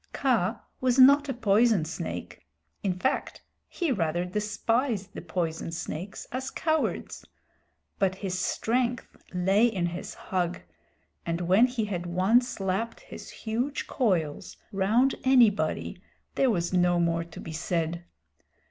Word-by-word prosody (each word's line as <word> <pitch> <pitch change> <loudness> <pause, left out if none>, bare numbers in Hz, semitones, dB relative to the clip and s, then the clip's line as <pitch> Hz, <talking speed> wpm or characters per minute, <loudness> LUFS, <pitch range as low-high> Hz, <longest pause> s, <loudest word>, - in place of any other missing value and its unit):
Kaa - - +1 0.2
was 255 -1 +1
not 280 +2 +7
a - - 0
poison 215 -4 +3
snake 165 - -6 0.4
in 185 -3 -1
fact 260 +9 -2 0.2
he 340 -5 -2
rather 175 -5 0
despised 210 +2 -1
the - - -6
poison 165 -1 -3
snakes 170 +3 -5
as 260 +1 -3
cowards 315 +2 -1 0.8
but 190 -2 +2
his 190 -1 -4
strength 240 +4 -1 0.2
lay 195 +5 +3
in 195 -7 -1
his 175 +1 -5
hug, 180 -2 -2 0.6
and 170 +1 -2
when 190 +8 +5
he 245 -3 -2
had 180 -4 -4
once 220 +8 +2
lapped 195 +4 -2
his - - -10
huge 240 +6 -3
coils 175 - -1
round 220 +7 +3
anybody 245 -6 +3 0.3
there 265 - +2
was 175 -5 0
no 175 -1 +3
more 170 -1 +1
to 165 0 -12
be 160 - -7
said. 170 +1 -2
195 Hz, 130 wpm, -27 LUFS, 175-240 Hz, 0.8 s, not